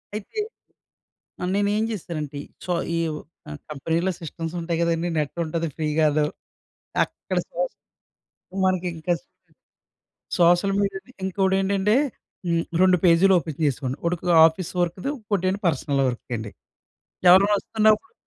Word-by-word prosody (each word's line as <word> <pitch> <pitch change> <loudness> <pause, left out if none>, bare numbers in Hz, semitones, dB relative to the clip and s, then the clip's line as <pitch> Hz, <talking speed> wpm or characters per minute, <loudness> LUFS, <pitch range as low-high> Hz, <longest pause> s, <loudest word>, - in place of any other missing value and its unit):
అయితే, 215 - -5 1.0
ఆహ్, 180 - -1
నేను 200 0 +2
ఏం 215 - +1
చేశానంటే 155 -8 -5 0.2
సో 180 - -1 0.2
ఈ - - +1 0.7
కంపెనీలో 165 +5 -1
సిస్టమ్స్ 165 0 -6
ఉంటాయి 165 0 -2
కదండీ 170 0 +1
నెట్ 150 +1 -2
ఉంటది 165 +1 -2
ఫ్రీ 155 -1 -1
గాను. 150 -1 +3 0.8
అక్కడ - - -4
సొస్ - - -2 0.9
మనకి 185 -1 +1
ఇంకా 160 +2 -1 1.3
సోషల్ 175 +3 +4
మీడియాను 195 +4 -3
ఇంకొకటేంటంటే 195 +2 +2 0.5
హ్మ్, 170 -1 +1 0.2
2 185 -1 +5
పేజీలు 180 +2 +6
ఓపెన్ 155 -2 -7
చేసేవాడిని. 135 -1 -1
ఒకటి 175 +1 0
ఆఫీస్ 165 +2 0
వర్క్‌‌ది 175 +8 -1
ఇంకోటేంటి 200 -3 -1
పర్సనల్ 145 -2 0
వర్క్‌కి 125 0 -5
అండి. 110 -2 -6 0.8
ఎవరైనా 195 +3 +7
వస్తున్నప్పుడు, 220 - +2
175 Hz, 120 wpm, -24 LUFS, 160-195 Hz, 1.3 s, ఎవరైనా